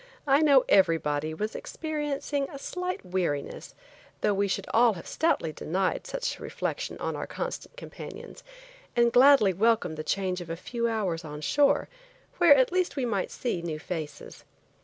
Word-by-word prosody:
I 275 0 +4
know 280 -4 +5
everybody 160 -5 +2
was 215 +5 -3
experiencing 295 -2 -3
a 280 - -8
slight 360 - -4
weariness, 175 -6 -3 0.5
though 210 - +2
we 200 +1 +1
should 195 0 -2
all 230 0 +5
have 175 - -9
stoutly 295 - 0
denied 185 +5 -2
such - - -3
a - - -15
reflection - - -4
on - - -3
our - - -5
constant 485 - -6
companions, - - -10 0.5
and 235 0 +3
gladly 255 -6 +6
welcomed 200 -5 +1
the 155 - -4
change 185 +2 -1
of 170 - -9
a 165 - -2
few 235 +7 -3
hours 200 -8 -1
on 150 -1 -7
shore, 285 - +2 0.5
where 340 -5 +8
at 260 +1 +3
least 365 -3 0
we 270 -4 -1
might 205 -5 -1
see 235 -9 -3
new 165 -2 -4
faces. 155 -2 -7
215 Hz, 165 wpm, -27 LUFS, 170-280 Hz, 0.5 s, where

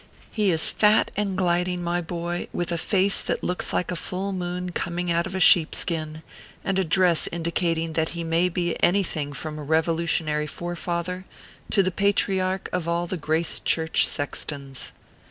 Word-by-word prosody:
He 210 -3 +1
is 160 -3 +3
fat 210 0 +4
and 200 -2 -1
gliding, 180 0 +1
my 175 +1 0
boy, 175 +1 -4
with 175 0 -2
a 170 - 0
face 195 +2 +2
that - - -2
looks 180 - -1
like 180 - -1
a - - -2
full 190 +3 -3
moon 180 0 -3
coming 175 0 -2
out 170 +2 +1
of 190 - -6
a - - -1
sheepskin, 160 -2 +3 0.4
and 195 -1 0
a - - +3
dress 175 0 +3
indicating 165 -1 -1
that 160 0 0
he 170 - -2
may 165 +2 +2
be 175 -1 -1
anything 170 -6 +1
from 150 +2 -6
a - - -6
Revolu 160 +2 +1
tionary 150 -2 0
Forefather 175 +2 -4 0.4
to 200 - +3
the 185 - 0
patriarch 190 -1 +1
of 180 -2 -1
all 170 +1 0
the 180 - -3
Grace 160 +1 0
Church 160 0 +2
sextons. 140 -2 -4
175 Hz, 170 wpm, -25 LUFS, 160-185 Hz, 0.4 s, fat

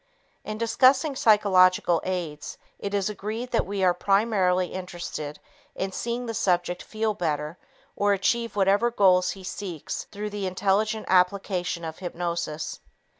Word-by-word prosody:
In 215 0 -5
discussing 255 +5 +3
psychological 185 -7 +4
aids, 170 -5 -4 0.2
it 200 0 -3
is 195 -2 +1
agreed 215 +4 -5
that 230 - +1
we 200 -1 -2
are 180 -1 +5
primarily 190 -2 +1
interested 175 -5 -6 0.4
in 190 0 -3
seeing 235 +5 -3
the 230 - -4
subject 175 -3 0
feel 220 0 -2
better 155 -3 -3 0.4
or 205 0 +2
achieve 230 +3 0
whatever 200 +4 +3
goals 185 -5 +4
he 190 - -11
seeks 185 -4 -5
through 210 0 -5
the 200 -2 -3
intelligent 205 +4 0
application 180 -1 +1
of 160 - -4
self - - -17
hypnosis. 170 -3 -4
195 Hz, 140 wpm, -26 LUFS, 180-215 Hz, 0.4 s, are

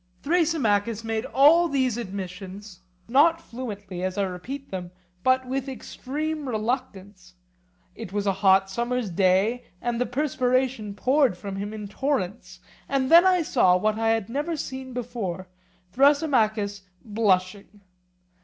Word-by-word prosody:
Thrasymachus 235 - +1
made 225 +1 -2
all 305 +6 +5
these 260 -6 0
admissions, 195 -2 -7 0.3
not 310 +7 +4
fluently, 205 - -7
as 185 +1 -3
I 200 - +2
repeat 195 +10 -6
them, 180 -2 -5 0.3
but 260 +4 +2
with 270 +1 -3
extreme 295 +3 -5
reluctance; 210 -5 -4 0.6
it 220 -5 -9
was 205 0 -2
a 195 - +2
hot 195 -1 +5
summer's 240 +1 -2
day, 195 +7 +2 0.2
and 240 0 -2
the 250 - +1
perspiration 255 -5 0
poured 255 -3 +2
from 195 0 -6
him 205 +1 -4
in 215 -1 -6
torrents; 195 -7 -3 0.3
and 270 0 0
then 340 +3 +8
I 365 -2 +3
saw 185 -11 +3
what 215 +3 0
I 225 0 +1
had 225 -3 +1
never 295 +7 -2
seen 260 -2 -6
before, 225 -7 -5 0.4
Thrasymachus 230 - +2 0.2
blushing. 205 -1 0
225 Hz, 135 wpm, -25 LUFS, 195-265 Hz, 0.6 s, then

